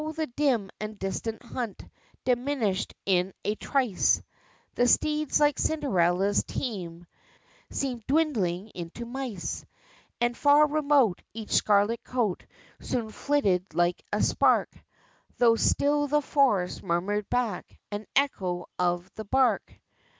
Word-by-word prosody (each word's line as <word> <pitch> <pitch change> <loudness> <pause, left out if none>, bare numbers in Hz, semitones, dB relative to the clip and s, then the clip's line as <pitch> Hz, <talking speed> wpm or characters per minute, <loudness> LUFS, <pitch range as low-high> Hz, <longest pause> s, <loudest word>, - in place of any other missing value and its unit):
the 315 -1 -1
dim 260 -9 +2
and 215 0 -5
distant 220 +4 -4
hunt 235 -3 -5 0.4
Diminished 245 -6 0
in 185 -1 +1
a 210 - +1
trice: 245 -2 +1 0.5
The 245 - +2
steeds, 300 +4 +2
like 295 -2 +3
Cinderella's 195 - +2
team, 175 -9 -5 0.6
Seemed 250 -5 -3
dwindling 225 - +1
into 180 +6 -7
mice; 240 -6 -5 0.6
And, 240 0 +1
far 290 +3 +5
remote, 290 -9 +2
each 220 -2 -7
scarlet 210 +2 +3
coat 230 -7 -1 0.4
Soon 230 -4 -3
flitted 210 -11 +1
like 175 0 +1
a - - +1
spark, - - +3 0.7
Tho' 235 -2 +5
still 290 +5 +2
the 295 +1 +1
forest 245 -12 +2
murmured 195 +3 -1
back 245 -3 -2
An 205 +1 -5
echo 185 -11 0
of 175 0 0
the 220 - -7
bark! 260 +4 +2
230 Hz, 120 wpm, -27 LUFS, 190-275 Hz, 0.7 s, far